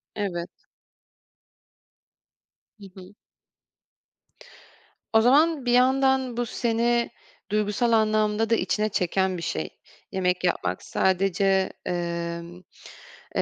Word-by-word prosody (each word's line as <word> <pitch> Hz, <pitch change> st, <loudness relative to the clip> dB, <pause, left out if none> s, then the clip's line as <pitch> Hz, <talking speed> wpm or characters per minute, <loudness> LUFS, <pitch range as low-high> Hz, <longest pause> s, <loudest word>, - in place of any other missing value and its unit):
Evet. 180 Hz, -4 st, -3 dB, 2.3 s
Hı 200 Hz, -, -11 dB
hı. 185 Hz, +1 st, -13 dB, 2.0 s
O 220 Hz, -, +6 dB
zaman, 290 Hz, +3 st, +3 dB
bir 245 Hz, -, +1 dB
yandan 260 Hz, 0 st, +3 dB
bu 240 Hz, -, 0 dB
seni 235 Hz, +1 st, 0 dB, 0.4 s
duygusal 210 Hz, +3 st, +1 dB
anlamda 215 Hz, 0 st, +2 dB
da 230 Hz, -, +4 dB
içine 215 Hz, -1 st, 0 dB
çeken 190 Hz, 0 st, 0 dB
bir -, -, -6 dB
şey. 80 Hz, -, -3 dB, 0.4 s
Yemek 180 Hz, -1 st, 0 dB
yapmak 95 Hz, -, -1 dB
sadece, 190 Hz, 0 st, +1 dB
emm, 170 Hz, 0 st, -4 dB, 0.7 s
eee, -, -, +2 dB
205 Hz, 95 wpm, -25 LUFS, 180-235 Hz, 2.3 s, O